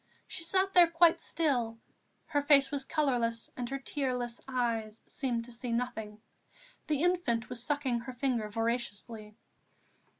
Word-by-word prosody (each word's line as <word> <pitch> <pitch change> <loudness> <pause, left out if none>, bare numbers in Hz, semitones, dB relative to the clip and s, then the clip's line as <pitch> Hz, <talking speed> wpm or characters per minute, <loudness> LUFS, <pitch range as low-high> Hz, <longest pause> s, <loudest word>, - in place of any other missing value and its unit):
She 365 - -4
sat 380 +3 +1
there 355 -2 +8
quite 335 0 +4
still; 250 -8 0 0.5
her 290 - 0
face 280 -1 +5
was 280 -2 -1
colourless 240 -7 0
and 245 -1 -4
her 275 - -2
tearless 250 -4 -3
eyes 230 -4 -1
seemed 240 -4 -2
to 245 - -10
see 235 +1 -4
nothing. 225 -3 -3 0.7
The 300 0 +1
infant 345 -11 +1
was 250 -2 -3
sucking 265 -2 0
her 250 +2 -7
finger 245 -4 -1
voraciously. 225 -1 -3
250 Hz, 140 wpm, -31 LUFS, 230-290 Hz, 0.7 s, there